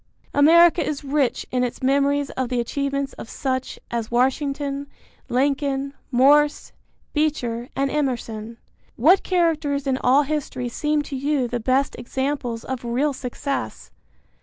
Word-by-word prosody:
America 335 +4 +6
is 295 -1 -3
rich 280 -2 0
in 250 0 +1
its 245 +1 -4
memories 280 +1 +2
of 260 -2 -3
the 250 -1 0
achievements 275 +3 -2
of - - -8
such 260 -1 -3
as 230 -2 -2
Washington, 275 +3 0 0.4
Lincoln, 275 +1 0 0.2
Morse, 290 +4 +4 0.4
Beecher 255 -6 -1
and 275 0 0
Emerson. 235 -6 -3 0.4
What 335 +11 +5
characters 320 -6 0
in 265 -1 0
all 270 +4 +4
history 275 -4 -3
seem 300 +4 0
to 285 - -6
you 275 -1 0
the 240 0 -3
best 260 +4 +1
examples 250 -2 -3
of 260 -2 -5
real 255 +5 0
success? 250 - -4
275 Hz, 135 wpm, -23 LUFS, 250-290 Hz, 0.4 s, America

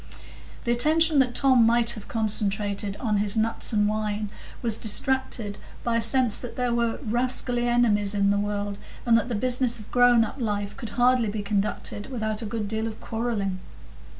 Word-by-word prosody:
The 235 - 0
attention 310 +5 +3
that 250 -2 +1
Tom 260 -4 +4
might 235 +1 +3
have 215 -4 -9
concentrated 205 -2 -1
on 215 -4 0
his 205 +1 0
nuts 225 +2 +1
and 210 -2 +2
wine 210 -1 -2 0.3
was 230 -2 +2
distracted 230 -2 -1 0.2
by 235 -1 0
a - - +1
sense 235 -1 +4
that 235 -2 -7
there 250 -1 -1
were 235 -1 0
rascally 245 +1 +1
enemies 210 -4 +2
in 200 0 +2
the 200 - +1
world, 205 0 -3 0.3
and 235 -2 +4
that 230 +2 +1
the 235 - -2
business 245 +1 +2
of 215 -2 -12
grown 245 -2 +5
up 255 - -8
life 205 -3 -3
could 235 -5 -7
hardly 245 -2 +3
be 205 0 -4
conducted 205 0 -3
without 220 -3 -2
a 225 - -4
good 215 -1 -3
deal 220 +1 -2
of 220 -1 -7
quarrelling. 220 -5 -3
225 Hz, 180 wpm, -25 LUFS, 205-240 Hz, 0.3 s, grown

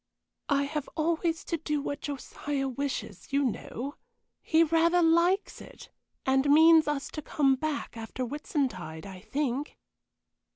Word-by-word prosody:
"I 280 -1 +3
have 295 0 -3
always 330 +1 0
to 335 - -2
do 300 -1 -2
what 285 0 -4
Josiah 280 0 -3
wishes, 260 -7 -4
you 280 +1 +2
know; 260 +2 -4 0.4
he 325 0 +4
rather 335 +2 +3
likes 340 +4 +2
it, - - -13 0.3
and 265 +2 +3
means 320 +1 +7
us 295 -2 -2
to 305 - -5
come 280 -2 +2
back 290 0 -3
after 225 +3 -5
Whitsuntide, 250 - -3
I 190 -2 -9
think." 270 +6 -3
285 Hz, 135 wpm, -29 LUFS, 265-320 Hz, 0.4 s, means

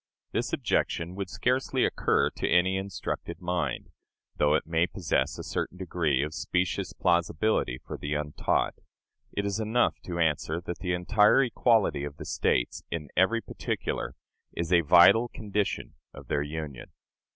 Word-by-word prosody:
This - - -1
objection 85 +2 0
would 95 -1 -5
scarcely 130 +3 +1
occur - - +1
to - - -3
any 95 +2 +3
instructed 95 -4 -4
mind, 90 -7 -2 0.4
though 75 0 +3
it - - 0
may 80 +2 +1
possess 90 -3 -1
a - - -6
certain 90 - -3
degree 80 -7 0
of 75 +1 -4
specious 90 +3 -1
plausibility 85 - +1
for - - -6
the 75 +1 -2
untaught. 75 0 0 0.6
It 100 - -2
is 100 +1 -1
enough 110 +3 +1
to 85 -1 -4
answer 80 0 0
that 85 0 -6
the 90 -2 -1
entire 105 +8 +4
equality 110 - +2
of 70 0 -6
the - - -8
States, - - 0
in 80 -3 -4
every 115 +6 +3
particular, - - -4 0.4
is 85 +1 -1
a 85 - +6
vital 85 +9 +6
condition 105 -2 -3 0.2
of - - -12
their 75 - +1
union. 75 -3 -6
90 Hz, 150 wpm, -28 LUFS, 80-100 Hz, 0.6 s, a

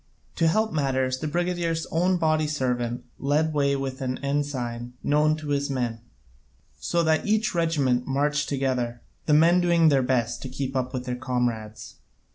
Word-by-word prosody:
To 165 - +3
help 215 +5 +1
matters 130 -3 0
the 155 - -3
brigadier's 170 0 -1
own 180 +3 +2
body 155 -2 +1
servant 125 -5 -2
led 150 +3 +1
the - - -7
way 140 -1 +2
with 135 -1 -4
an 130 -1 -2
ensign 125 -4 -2
known 150 +1 +2
to 155 -1 -7
his 140 0 0
men, 120 -4 -2 0.8
so 170 - 0
that 160 +4 +1
each 215 +1 +1
regiment 145 -8 +1
marched 145 +2 0
together, 130 -4 -1 0.2
the 150 - +5
men 170 +3 +5
doing 170 -2 +4
their 140 -2 +3
best 120 -2 0
to 130 - -6
keep 135 +1 -4
up 130 -1 -1
with 125 -1 -4
their 125 -1 -2
comrades. 120 -4 -3
140 Hz, 170 wpm, -25 LUFS, 125-160 Hz, 0.8 s, the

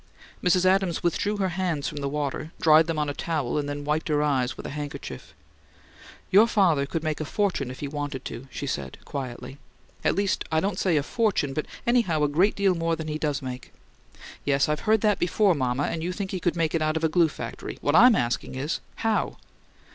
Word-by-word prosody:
Mrs. 180 +1 +3
Adams 185 -2 +2
withdrew 205 +5 0
her 190 -2 0
hands 175 -5 -1
from 150 - -5
the 140 -1 -2
water, 150 +2 -3
dried 155 0 +6
them 165 -2 -2
on 150 -1 0
a 145 - -2
towel, 150 -4 -1
and 145 -1 -3
then 145 0 -5
wiped 155 +4 0
her 150 -2 +2
eyes 130 -4 0
with - - -8
a - - -5
handkerchief. 140 - -7 1.0
"Your 210 +4 +7
father 170 -11 +3
could 165 +2 -3
make 155 -2 -1
a - - 0
fortune 180 -5 -1
if 130 - -8
he 145 - -2
wanted 145 -2 -4
to," 130 +3 -7
she 140 - -5
said, 70 - -4
quietly. 130 0 -6 0.4
"At - - +2
least, 200 +1 0
I 160 - +3
don't 190 +1 -1
say 175 -5 +2
a 145 - +1
fortune, 195 - 0
but 155 - -3 0.2
anyhow 220 -11 +2
a - - +4
great 175 +8 +2
deal 200 -2 +3
more 165 -1 0
than 160 -1 -6
he 155 0 -3
does 145 -3 -1
make." 125 -1 -7 0.7
"Yes, 140 -1 +2
I've 150 0 0
heard 220 -1 +4
that 210 -2 +2
before, 185 +2 +3
mama, 130 -2 0
and 160 - -2
you 175 +2 -2
think 190 +1 -4
he 185 - -2
could 175 0 0
make 165 -2 0
it 165 - +1
out 155 +1 +1
of 160 - -4
a - - +5
glue 165 +1 +3
factory. 120 -5 -7
What 145 - +1
I'm 245 +3 +8
asking 120 -3 -1
is: 140 +4 -2 0.3
How?" 220 -1 +1
155 Hz, 225 wpm, -26 LUFS, 145-180 Hz, 1.0 s, I'm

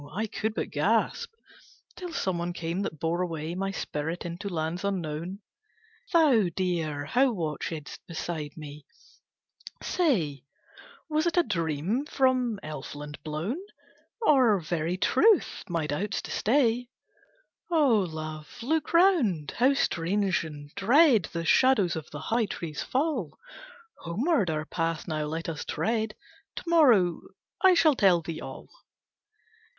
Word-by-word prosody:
I 215 +4 -1
could 220 0 -3
but - - -3
gasp, - - +1 0.6
Till 360 -2 -7
someone 175 - -2
came 170 +1 -3
that 155 -6 -4
bore 165 +3 0
away 165 -2 -3
My 195 +2 -2
spirit 165 -2 -4
into 175 +4 -5
lands 165 +1 -3
unknown: 180 0 -3 0.7
Thou, 280 - +4
dear, 165 -6 -1
who 255 - +3
watchedst 160 -2 -4
beside 160 -3 -5
me, 150 -1 -10 1.0
say 175 - 0 0.6
Was 310 +1 +1
it 340 - -1
a 350 - +6
dream 175 - -1
from 255 -6 +1
elfland 145 0 -7
blown, 160 - -3 0.6
Or 255 - +5
very 170 +1 -2
truth, 370 - +3
my 165 -3 -1
doubts 190 +8 -2
to - - -7
stay." 240 0 +2 0.8
"O 290 -10 +4
Love, 155 +1 -6
look 315 +6 -1
round, 280 - +3
how 260 +4 +4
strange 190 -3 +1
and 145 -2 -9
dread 235 - +5
The 170 -1 -3
shadows 210 -3 +4
of 160 -2 -6
the 150 - -7
high 225 +5 0
trees 160 -5 -5
fall, 265 - -1 0.6
Homeward 210 - 0
our 155 -1 -2
path 165 0 -2
now 155 -2 -2
let 160 +2 -4
us 160 -3 -4
tread, 220 -1 -1 0.4
To - - -6
morrow 250 - +4 0.4
I 375 -1 +7
shall 315 -3 +5
tell 185 -8 +4
thee 160 -1 -5
all. 135 0 -8
180 Hz, 130 wpm, -28 LUFS, 160-245 Hz, 1.0 s, I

